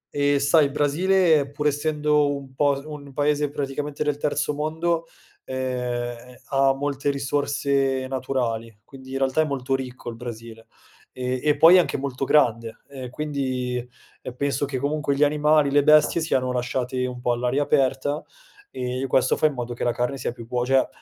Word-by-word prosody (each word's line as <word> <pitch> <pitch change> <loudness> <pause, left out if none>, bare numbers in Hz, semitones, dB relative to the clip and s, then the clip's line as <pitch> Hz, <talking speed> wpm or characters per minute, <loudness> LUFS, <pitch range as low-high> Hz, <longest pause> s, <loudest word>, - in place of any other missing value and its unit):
Eh, 145 0 +2
sai, 145 +2 +4
il 140 - -2
Brasile, 155 0 +2
pur 145 +1 -5
essendo 150 -1 +1
un 135 -1 -12
po' 145 +1 +2
s - - -12
un 145 -2 -9
paese 145 +1 +1
praticamente 145 +1 -3
del 150 -1 -1
terzo 150 0 -1
mondo, 160 +3 -1 0.4
ehm, 125 -1 -4
ha 135 -1 +3
molte 140 0 -2
risorse 140 -1 0
naturali, 120 -4 -3
quindi 130 -1 -13
in - - -1
realtà 135 +3 +1
è - - +2
molto 135 -2 -2
ricco 130 -2 -4
il - - -9
Brasile. 115 -1 -9 0.5
Ehm, 125 0 -2
e 150 -1 +2
poi 170 +3 +8
è - - +7
anche 175 - 0
molto 135 0 -3
grande, 115 -6 +2
ehm, 130 -3 -7
quindi, 130 -3 -3 0.5
ehm, 125 - -7
penso 140 +1 -1
che 135 -1 -4
comunque 145 +1 -1
gli 145 - +3
animali, 150 -1 +3
le 145 - +5
bestie 155 +3 +4
siano 130 -5 0
lasciate 125 +1 -2
un 125 -1 -7
po' 125 - 0
all'aria 125 +4 0
aperta 135 +2 0 0.5
e 125 +1 -3
questo 130 0 +2
fa 155 - +3
in 150 - -3
modo 120 -1 -4
che - - -5
la 120 - +1
carne 125 +3 -2
sia - - -2
più 120 -1 -10
buo 125 0 -1
cioè, 135 +1 +3
140 Hz, 180 wpm, -24 LUFS, 125-145 Hz, 0.5 s, poi